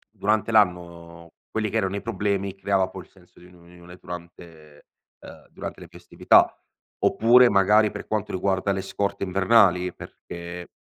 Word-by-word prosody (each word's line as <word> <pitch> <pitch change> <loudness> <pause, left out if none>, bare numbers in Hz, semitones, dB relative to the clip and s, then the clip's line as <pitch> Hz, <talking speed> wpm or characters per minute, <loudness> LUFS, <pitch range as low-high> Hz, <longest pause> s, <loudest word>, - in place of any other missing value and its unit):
durante 110 +2 0
l'anno 85 -4 -1 0.2
quelli 110 -1 -2
che 115 - -4
erano 95 -2 -2
i 100 - -5
problemi, 100 -3 -2
creava 95 -1 0
poi 95 -1 -10
il - - -26
senso 90 -2 -23
di 90 - -16
un 90 - -19
unione 90 0 -16
durante, 85 -4 -12 0.3
ehm, - - -14
durante - - -8
le - - -12
festività. - - +2 0.5
Oppure 125 +2 +5
magari 105 +1 +3
per 105 - -9
quanto 105 -1 -3
riguarda 95 +1 -1
le 95 0 -3
scorte 100 +1 -3
invernali, 95 -2 +3
perché 85 0 -10
95 Hz, 155 wpm, -24 LUFS, 90-105 Hz, 0.5 s, Oppure